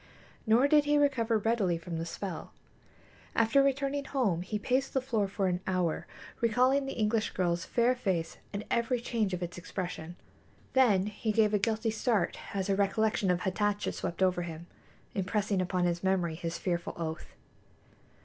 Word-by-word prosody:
Nor 235 +5 +5
did 295 0 +5
he 295 0 +3
recover 250 -6 +2
readily 210 -5 +1
from 165 0 -5
the 165 - -3
spell. 180 -1 -6 0.8
After 230 +5 +4
returning 275 +1 0
home 225 -12 0
he 205 +4 -3
paced 260 +6 0
the - - +4
floor 230 -6 0
for 195 0 -2
an 180 -1 +1
hour, 180 -4 0 0.3
recalling 255 +4 +3
the 270 - -3
English 215 0 +1
girl's 175 -2 0
fair 240 +1 +2
face 190 -9 -2
and 205 +1 -4
every 235 +1 +1
change 230 -4 -1
of 180 -1 -3
its 175 0 -5
expression. 175 -2 -5 0.6
Then 215 -8 +4
he 210 +1 -2
gave 215 -1 +3
a 210 - +3
guilty 220 +2 0
start 220 -4 0 0.2
as 190 -1 -1
a 195 - +2
recollection 205 0 +1
of 180 0 +2
Hatatcha 205 +2 0
swept 175 +2 -2
over 180 -1 +2
him, 170 -1 -6 0.5
impressing 200 0 0
upon 180 0 0
his 175 0 -1
memory 185 -3 +1
his 165 +1 -4
fearful 175 -2 -2
oath. 160 -1 -5
205 Hz, 170 wpm, -30 LUFS, 180-235 Hz, 0.8 s, Nor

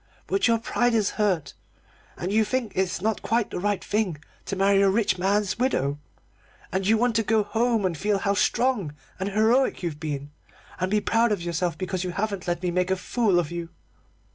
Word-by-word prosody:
But 390 - +1
your 230 -1 +4
pride 240 +1 0
is 210 -3 +2
hurt, 185 -8 0 0.6
and 180 +4 -3
you 220 +1 +4
think 240 -1 -2
it's 185 -1 -1
not 220 -1 0
quite 230 -2 0
the - - -3
right 205 +1 -1
thing 205 -7 -1 0.3
to 195 - -3
marry 195 +1 +3
a 200 - +5
rich 195 -2 +1
man's 200 +2 +1
widow. 145 - 0 0.7
And 190 +2 -1
you 220 +1 +4
want 240 0 +1
to - - +3
go 220 0 +2
home 225 0 +1
and 180 -3 0
feel 205 +5 0
how 200 +1 0
strong 205 - +1 0.2
and 190 +1 -1
heroic 220 +4 +2
you've 160 -4 -3
been, 145 -2 -4 0.5
and 185 0 0
be 210 +1 +2
proud 225 +2 +2
of 200 -5 -1
yourself 170 0 -1
because 185 -1 -3
you 185 - -3
haven't 200 -1 -3
let 175 0 -1
me 180 - 0
make 180 +1 0
a 190 - +2
fool 195 +1 +1
of 170 -3 0
you." 170 -1 -5
200 Hz, 205 wpm, -25 LUFS, 180-220 Hz, 0.7 s, a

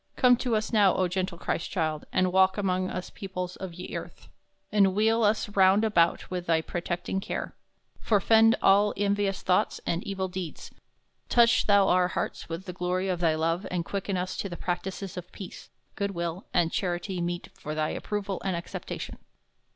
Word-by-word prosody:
Come 250 -2 +6
to 245 -2 0
us 215 +2 -2
now, 205 -4 +5
O 185 - +2
gentle 185 0 -2
Chrystchilde, 160 -3 -2
and 185 -1 +1
walke 190 +1 +4
among 185 -2 0
us 180 - -5
peoples 180 -2 -5
of 185 -3 -7
ye 180 +1 -7
earth; - - -8 0.4
enwheel 210 +3 +3
us 215 +1 +2
round 195 +1 +4
about 170 -6 +2
with 180 -1 -4
thy 165 -1 +3
protecting 175 +3 -3
care; - - -4 0.4
forefend 225 +2 +4
all 205 +2 +5
envious 200 -1 0
thoughts 180 - +1
and 170 +2 -1
evil 195 -1 -2
deeds; 180 -3 -6 0.6
toche 235 0 +4
thou 200 -2 +5
our 180 -1 +4
hearts 180 - -4
with 165 +3 -5
the 180 - -6
glory 180 +1 -1
of 180 -2 -1
thy 165 -2 +2
love, 165 +4 -1
and 175 -2 -2
quicken 195 0 -2
us 180 +1 -3
to 200 - -3
practices 185 +1 -4
of 180 0 -7
peace, 190 -3 -10 0.2
good 200 -2 -3
will, 170 +2 -4
and 170 -2 +2
charity 180 0 -2
meet 175 0 -3
for 150 +1 -6
thy 155 0 0
approval 200 -2 -3
and 190 -2 -1
acceptation. 170 - -6
185 Hz, 175 wpm, -27 LUFS, 175-200 Hz, 0.6 s, Come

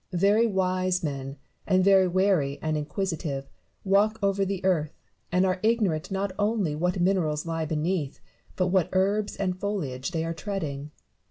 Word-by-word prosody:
Very 205 +5 +4
wise 185 -2 0
men, 135 -2 -4 0.3
and 185 -1 +3
very 190 -1 +5
wary 180 -6 +2
and 155 -1 -1
inquisitive, 150 -2 -3 0.4
walk 205 +3 +3
over 195 0 +2
the 195 -1 -3
earth, 160 -5 +1 0.3
and 180 +1 +3
are 185 0 0
ignorant 215 -9 +1
not 195 0 -2
only 205 -6 +1
what 180 +4 0
minerals 175 -5 +1
lie 165 -1 -2
beneath, 155 -1 -2 0.4
but 185 -1 +1
what 185 -2 +2
herbs 200 +3 +1
and 185 -2 -2
foliage 150 -12 -3
they 165 -2 -2
are 165 - -2
treading. 155 -6 -4
185 Hz, 155 wpm, -26 LUFS, 155-195 Hz, 0.4 s, very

